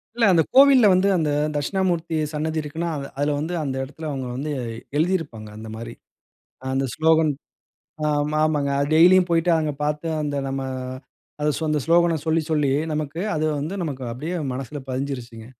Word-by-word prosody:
இல்ல. 235 Hz, -1 st, +3 dB
அந்த 165 Hz, -, +5 dB
கோவில்ல 265 Hz, -4 st, +7 dB
வந்து, 185 Hz, +2 st, +3 dB
அந்த 155 Hz, -2 st, 0 dB, 0.3 s
தக்ஷிணாமூர்த்தி 170 Hz, +1 st, -1 dB, 0.2 s
சன்னதி 155 Hz, +1 st, -1 dB
இருக்குன்னா, 160 Hz, +3 st, -4 dB, 0.3 s
அதில 145 Hz, 0 st, +1 dB
வந்து 160 Hz, +4 st, -3 dB
அந்த 135 Hz, -2 st, -3 dB
இடத்தில 155 Hz, +3 st, -7 dB
அவுங்க 135 Hz, -2 st, -4 dB
வந்து 150 Hz, +3 st, -3 dB, 0.5 s
எழுதியிருப்பாங்க. 155 Hz, -, -1 dB
அந்தமாரி. 110 Hz, +1 st, -7 dB, 0.7 s
அ -, -, -12 dB
அந்த 135 Hz, 0 st, +1 dB
ஸ்லோகன் 160 Hz, -1 st, +3 dB, 0.7 s
ஆ -, -, +2 dB, 0.2 s
ம 155 Hz, -, -3 dB
ஆமங்க. 145 Hz, -3 st, +1 dB
அது 140 Hz, -, 0 dB
டெய்லியும் 180 Hz, +2 st, +6 dB
போயிட்டு, 170 Hz, +1 st, +2 dB
அங்க 155 Hz, -2 st, -1 dB
பாத்து, 150 Hz, +2 st, -1 dB
அந்த 145 Hz, -1 st, -2 dB
நம்ம, 135 Hz, 0 st, -3 dB, 0.8 s
அத 150 Hz, -, +1 dB
சொ -, -, -6 dB
அந்த 150 Hz, -, +1 dB
ஸ்லோகன 170 Hz, 0 st, +4 dB
சொல்லி, 160 Hz, 0 st, +2 dB
சொல்லி, 150 Hz, -3 st, +2 dB, 0.2 s
நமக்கு 150 Hz, +2 st, -3 dB
அது 155 Hz, -, 0 dB, 0.2 s
வந்து 160 Hz, +7 st, -4 dB
நமக்கு 140 Hz, -5 st, -4 dB
அப்பிடியே 155 Hz, +9 st, -4 dB, 0.2 s
மனசுல 135 Hz, +2 st, -5 dB
பதிஞ்சிருச்சுங்க. 125 Hz, -4 st, -5 dB
155 Hz, 160 wpm, -23 LUFS, 140-165 Hz, 0.8 s, கோவில்ல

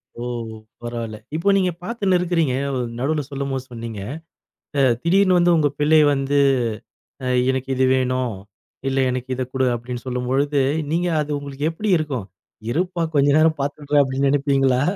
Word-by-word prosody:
ஓ! 120 Hz, -, -8 dB, 0.6 s
பரவால்ல. 115 Hz, -2 st, -5 dB, 0.2 s
இப்ப 170 Hz, +5 st, +2 dB
நீங்கப் 180 Hz, -3 st, 0 dB
பாத்துன்னு 200 Hz, -3 st, +1 dB
இருக்குறீங்க. 170 Hz, -6 st, +1 dB, 0.5 s
நடுவுல 150 Hz, +3 st, 0 dB
சொல்லும் 140 Hz, 0 st, -3 dB
போது 130 Hz, -1 st, -3 dB
சொன்னீங்க. 115 Hz, -3 st, -6 dB, 0.8 s
அ. -, -, +4 dB, 0.2 s
திடீர்னு 185 Hz, +2 st, +4 dB
வந்து 175 Hz, 0 st, +4 dB
உங்க 150 Hz, -2 st, +3 dB
பிள்ளை 155 Hz, +1 st, +5 dB
வந்து, 140 Hz, +1 st, 0 dB, 0.9 s
அ. -, -, -1 dB, 0.2 s
எனக்கு 130 Hz, 0 st, -3 dB
இது 130 Hz, 0 st, +3 dB
வேணும், 130 Hz, -3 st, 0 dB, 0.5 s
இல்ல 135 Hz, 0 st, 0 dB
எனக்கு 130 Hz, +1 st, -4 dB
இதைக் 130 Hz, 0 st, -4 dB
கொடு, 130 Hz, 0 st, +1 dB
அப்படின்னு 120 Hz, +1 st, -6 dB
சொல்லும்பொழுது, 135 Hz, +3 st, 0 dB, 0.3 s
நீங்க 175 Hz, +2 st, +1 dB
அது 150 Hz, 0 st, -4 dB
உங்களுக்கு 140 Hz, 0 st, -5 dB
எப்படி 205 Hz, +5 st, -2 dB
இருக்கும்? 135 Hz, -10 st, -3 dB, 0.4 s
இருப்பா, 175 Hz, +3 st, -1 dB
கொஞ்ச 140 Hz, 0 st, +4 dB
நேரம் 155 Hz, -1 st, +3 dB
பாத்துடுற. 145 Hz, +1 st, -3 dB
அப்படின்னு 135 Hz, +1 st, 0 dB
நெனைப்பீங்களா? 135 Hz, -2 st, +2 dB
140 Hz, 150 wpm, -21 LUFS, 130-160 Hz, 0.9 s, பிள்ளை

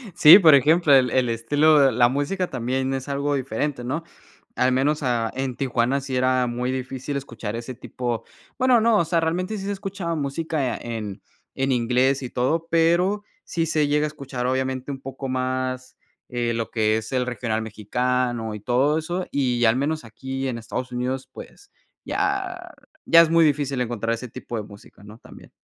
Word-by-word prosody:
Sí, 165 Hz, +2 st, +10 dB
por 160 Hz, -6 st, +7 dB
ejemplo, 155 Hz, +3 st, +4 dB
el 130 Hz, -2 st, +5 dB
el 130 Hz, -2 st, +2 dB
estilo 145 Hz, +5 st, +3 dB
la 120 Hz, 0 st, +4 dB
música 160 Hz, +7 st, -1 dB
también 130 Hz, +2 st, -2 dB
es 135 Hz, +1 st, -4 dB
algo 140 Hz, +1 st, -1 dB
diferente, 130 Hz, 0 st, -3 dB
¿no? 145 Hz, +7 st, -3 dB, 0.5 s
Al 130 Hz, +1 st, +2 dB
menos, 145 Hz, +4 st, +1 dB
ah, 120 Hz, -3 st, 0 dB
en 130 Hz, -2 st, -3 dB
Tijuana 130 Hz, +1 st, 0 dB
sí 135 Hz, -1 st, -5 dB
era 130 Hz, 0 st, +2 dB
muy 125 Hz, +2 st, -2 dB
difícil 130 Hz, +2 st, -4 dB
escuchar 115 Hz, -5 st, -6 dB
ese 120 Hz, +2 st, -6 dB
tipo, 120 Hz, -1 st, -4 dB, 0.3 s
bueno, 255 Hz, -2 st, +4 dB
no 225 Hz, -1 st, +4 dB
o 170 Hz, -, +1 dB
sea, 165 Hz, +1 st, +1 dB
realmente 180 Hz, +6 st, -1 dB
sí 195 Hz, -, -6 dB
se 200 Hz, -, -2 dB
escuchaba 195 Hz, -4 st, -4 dB
música 145 Hz, -2 st, -2 dB
en 105 Hz, -4 st, -6 dB, 0.3 s
en 135 Hz, 0 st, 0 dB
inglés 125 Hz, +3 st, +2 dB
y 125 Hz, -, -5 dB
todo, 155 Hz, +8 st, -1 dB
pero 175 Hz, +5 st, +2 dB, 0.2 s
sí 165 Hz, -1 st, -2 dB
se 155 Hz, -2 st, +1 dB
llega 150 Hz, +1 st, +2 dB
a -, -, 0 dB
escuchar, 135 Hz, -4 st, -6 dB
obviamente, 130 Hz, +1 st, -2 dB
un 135 Hz, -1 st, -7 dB
poco 135 Hz, 0 st, -6 dB
más, 130 Hz, 0 st, -3 dB, 0.3 s
eh, 120 Hz, -1 st, -1 dB
lo 115 Hz, -1 st, -3 dB
que 110 Hz, -1 st, +1 dB
es 110 Hz, +3 st, -6 dB
el 125 Hz, -1 st, 0 dB
regional 120 Hz, -3 st, -2 dB
mexicano 120 Hz, +2 st, -2 dB
y 105 Hz, -, -7 dB
todo 135 Hz, +6 st, +2 dB
eso, 175 Hz, +3 st, -3 dB
y 125 Hz, -4 st, +1 dB
al 110 Hz, 0 st, +4 dB
menos 150 Hz, +3 st, -2 dB
aquí 135 Hz, +4 st, -5 dB
en 120 Hz, -2 st, -3 dB
Estados 125 Hz, +2 st, -5 dB
Unidos, 130 Hz, +2 st, -3 dB
pues 405 Hz, -, -13 dB, 0.3 s
ya 380 Hz, -3 st, -2 dB, 0.3 s
ya 165 Hz, 0 st, +7 dB
es 165 Hz, -, +3 dB
muy 165 Hz, 0 st, +5 dB
difícil 140 Hz, -3 st, 0 dB
encontrar 115 Hz, -1 st, -2 dB
ese 120 Hz, +2 st, -6 dB
tipo 115 Hz, +1 st, -7 dB
de 105 Hz, -, -3 dB
música, 100 Hz, 0 st, -15 dB
¿no? 105 Hz, +2 st, -12 dB
También. -, -, -15 dB
130 Hz, 185 wpm, -23 LUFS, 120-155 Hz, 0.5 s, Sí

